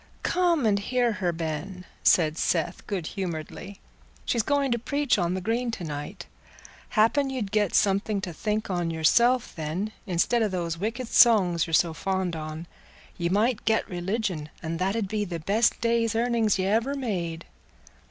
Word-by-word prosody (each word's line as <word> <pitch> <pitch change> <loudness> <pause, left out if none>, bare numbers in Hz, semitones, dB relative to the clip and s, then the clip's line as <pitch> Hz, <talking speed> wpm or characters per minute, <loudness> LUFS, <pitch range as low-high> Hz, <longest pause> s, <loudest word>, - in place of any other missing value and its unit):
"Come 345 -6 +2
and 205 -2 +3
hear 245 +3 +1
her, 185 -4 -1
Ben," 170 +3 -5 0.2
said 155 -3 +4
Seth, 170 0 -1
good 190 -5 -3
humouredly; 185 +1 -6 0.5
"she's 235 - +1
going 280 +2 +1
to 235 - +1
preach 280 -1 0
on 175 0 0
the 185 - -3
Green 235 +5 -1
to 225 -6 -5
night; 145 -2 -6 0.6
happen 255 +6 +3
ye'd 240 -7 -3
get 210 -3 +1
something 200 +1 +2
to 180 -3 -5
think 210 +5 -2
on 175 -2 -1
yourself 235 +10 +3
then, 165 +7 -3 0.2
instead 190 +6 +1
o' 220 - +3
those 170 -4 -3
wicked 230 +5 -3
songs 190 -10 +5
you're 165 - +2
so 165 -1 +3
fond 190 0 -2
on. 155 +1 -6 0.5
Ye 170 0 0
might 215 +5 +1
get 220 0 +1
religion, 180 -4 -3
and 165 0 -3
that 190 +3 0
'ud 220 -4 -1
be 210 +1 -1
the 175 -4 -4
best 205 +8 +2
day's 230 -1 +1
earnings 230 -3 +2
y' 185 - 0
ever 225 +8 +1
made." 175 -11 -3
200 Hz, 170 wpm, -26 LUFS, 170-230 Hz, 0.6 s, songs